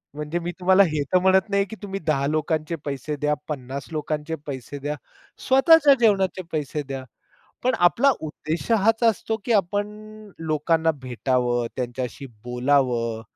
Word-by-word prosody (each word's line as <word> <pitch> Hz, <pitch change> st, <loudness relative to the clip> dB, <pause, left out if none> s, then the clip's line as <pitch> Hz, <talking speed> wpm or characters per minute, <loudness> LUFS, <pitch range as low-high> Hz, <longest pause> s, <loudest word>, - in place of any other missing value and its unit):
म्हणजे 150 Hz, +3 st, -3 dB
मी 175 Hz, +1 st, -4 dB
तुम्हाला 190 Hz, +2 st, +5 dB
हे 150 Hz, -2 st, -1 dB
तर 185 Hz, -, +6 dB
म्हणत 190 Hz, +2 st, +3 dB
नाही 200 Hz, 0 st, +2 dB
की -, -, -7 dB
तुम्ही 195 Hz, -1 st, -4 dB
10 140 Hz, -4 st, 0 dB
लोकांचे 155 Hz, +1 st, -1 dB
पैसे 145 Hz, +1 st, -3 dB
द्या, 150 Hz, +1 st, 0 dB
50 135 Hz, -1 st, -5 dB
लोकांचे 155 Hz, +1 st, -3 dB
पैसे 140 Hz, 0 st, -6 dB
द्या, 145 Hz, +2 st, -3 dB, 0.5 s
स्वतःच्या 285 Hz, +2 st, +6 dB
जेवणाचे 195 Hz, -5 st, +2 dB
पैसे 150 Hz, -1 st, -2 dB
द्या. 135 Hz, -1 st, -6 dB, 0.6 s
पण 255 Hz, -, +2 dB
आपला 275 Hz, +9 st, +3 dB
उद्देश 155 Hz, +6 st, -4 dB
हाच 225 Hz, +2 st, +3 dB
असतो 225 Hz, 0 st, +1 dB
की 240 Hz, -, -1 dB
आपण 205 Hz, +1 st, +1 dB, 0.5 s
लोकांना 160 Hz, +1 st, +1 dB
भेटावं, 125 Hz, -1 st, 0 dB
त्यांच्याशी 125 Hz, +2 st, -4 dB, 0.2 s
बोलावं. 125 Hz, -2 st, +1 dB
155 Hz, 145 wpm, -24 LUFS, 135-195 Hz, 0.6 s, तर